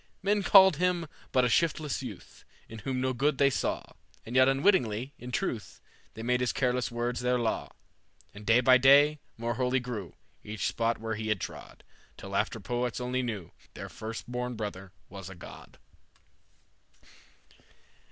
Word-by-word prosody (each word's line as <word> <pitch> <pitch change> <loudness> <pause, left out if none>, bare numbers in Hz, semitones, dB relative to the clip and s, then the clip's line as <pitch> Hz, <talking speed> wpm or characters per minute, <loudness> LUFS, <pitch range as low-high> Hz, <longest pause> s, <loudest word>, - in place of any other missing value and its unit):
"Men 205 +1 +2
called 190 -3 +7
him 180 -1 +1 0.3
but 130 -1 +3
a - - +3
shiftless 155 +2 +1
youth, 115 -8 -10 0.2
In 110 - -9
whom 130 +3 -3
no 130 0 0
good 140 +3 +1
they 140 0 +4
saw, - - -1 0.4
And 115 - -7
yet 130 0 +6
unwittingly, 135 - +2
in 125 +1 -8
truth, 115 -2 -3 0.4
They 110 - -7
made 125 +1 +1
his 125 -1 +1
careless 125 -2 0
words 120 +1 -2
their 125 0 +1
law. 115 -2 -1 0.6
"And 105 - -11
day 115 +3 +4
by 130 0 +6
day 145 +3 +6 0.2
more 115 +1 -2
holy 125 +2 +1
grew 115 -8 -6 0.3
Each 105 -2 -4
spot 115 0 0
where 110 0 -3
he 110 0 -4
had 105 -3 0
trod, - - -8 0.3
Till - - -7
after - - 0
poets 120 0 -2
only 125 +1 -1
knew 110 -9 -5 0.2
Their - - -7
first 110 +1 -7
born 125 0 -3
brother 95 -3 -6 0.2
was 95 -1 -9
a 95 - -10
god." 85 - -12
125 Hz, 165 wpm, -29 LUFS, 110-135 Hz, 0.6 s, called